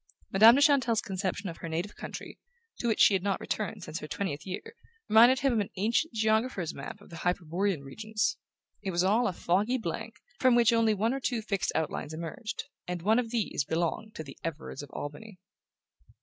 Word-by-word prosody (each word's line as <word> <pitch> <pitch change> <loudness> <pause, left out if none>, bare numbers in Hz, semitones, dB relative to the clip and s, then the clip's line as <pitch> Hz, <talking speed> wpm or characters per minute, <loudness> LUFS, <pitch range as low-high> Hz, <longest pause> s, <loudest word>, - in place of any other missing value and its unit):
Madame 220 +5 +9
de 280 - +3
Chantelle's 265 -7 +4
conception 195 +1 -3
of 165 - -6
her 165 - -6
native 170 +6 -3
country - - -8 0.4
to 240 - -1
which 225 - +1
she - - +7
had 190 - +2
not 200 0 0
returned 215 -2 -3
since 155 0 -5
her 150 - -7
twentieth 155 -2 -4
year 450 - -6 0.3
reminded 240 +4 +6
him 275 -2 +3
of 225 - +2
an 205 - -1
ancient 230 +11 +1
geographer's 220 -5 0
map 140 +9 -8
of 205 - -16
the 170 - -8
Hyperborean 180 0 -1
regions. 215 - -2 0.4
It 200 - -3
was 175 -1 +1
all 220 +6 +3
a - - 0
foggy 200 +8 +1
blank, 225 +2 -5 0.2
from 255 -2 +5
which 235 -1 +5
only 225 -2 +3
one 220 +5 +1
or 270 - -2
two 245 -4 -1
fixed 200 -3 -1
outlines 155 -1 -2
emerged; 170 +8 -5 0.2
and 175 -1 -4
one 220 +5 +4
of 235 -2 -2
these 225 -10 -1
belonged 170 +8 -2
to 155 - -5
the 135 -3 -12
Everards 160 -3 -5
of 145 - -10
Albany. 180 +10 -7
205 Hz, 200 wpm, -29 LUFS, 170-230 Hz, 0.4 s, Madame